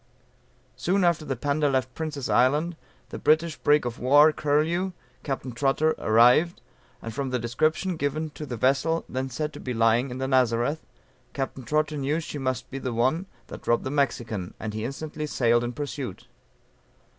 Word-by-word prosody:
Soon 190 +2 +1
after 170 -3 +2
the 135 -2 -2
Panda 145 +4 0
left 130 -2 0
Prince's 155 -4 -4
Island, 150 +7 +2 0.3
the - - -6
British 155 +1 +2
brig 145 -2 +3
of 120 -1 -4
war, 145 +5 +6
Curlew, 160 +6 0 0.3
Capt. 135 -3 -4
Trotter 140 +5 +2
arrived, 125 +10 +4 0.4
and 115 - -5
from 135 +2 -2
the 125 - 0
description 155 +9 0
given 150 +2 -2
of 150 - -6
the 120 - -4
vessel 140 +7 +1
then 130 +1 -3
said 150 +5 -3
to - - -9
be 125 -2 -4
lying 115 +3 +3
in 125 - -6
the 130 0 -2
Nazareth, 130 +3 +1 0.5
Capt. 135 -1 -4
Trotter 155 +2 0
knew 145 +3 0
she 155 -2 -6
must 130 -1 -3
be 135 - -4
the 130 -2 -3
one, 130 +11 +1 0.2
that - - -11
robbed 120 - +2
the 130 - -3
Mexican; 115 -9 -1
and 110 -1 -4
he 110 0 -4
instantly 150 +3 -5
sailed 120 -4 +2
in 120 - -2
pursuit. 135 -5 -5
135 Hz, 175 wpm, -26 LUFS, 125-155 Hz, 0.5 s, war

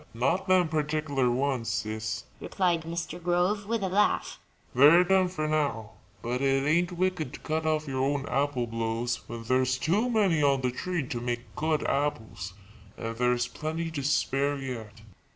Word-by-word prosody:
"Not 140 - 0
them 185 -2 +4
particular 150 -4 0
ones, 125 -2 0
Sis," 110 0 -3 0.2
replied 175 -4 0
Mr. 170 +1 -5
Grove, 180 +4 +1
with 225 -2 -1
a - - +1
laugh; 195 +3 +1 0.3
"they're 150 +7 +7
done 190 0 +3
for 155 -4 -3
now. 140 -9 -1 0.3
But 125 +2 -2
it 135 0 +2
ain't 175 +3 +2
wicked 175 -6 -1
to - - -10
cut 160 0 -2
off 155 -1 0
your 130 -1 -1
own 140 0 0
apple 140 -3 0
blows 115 +1 -2
when 115 0 -6
there's 130 +2 +2
too 190 - +1
many 200 -9 +2
on 140 -2 +3
the 125 -1 0
tree 175 +3 -2
to 120 -2 -4
make 120 -2 -4
good 155 -1 0
apples, 125 -9 -2 0.4
and 115 0 -4
there's 125 0 +1
plenty 160 +4 -4
to 150 -3 -3
spare 140 0 +1
yet." 115 -5 -7
145 Hz, 170 wpm, -28 LUFS, 125-170 Hz, 0.4 s, they're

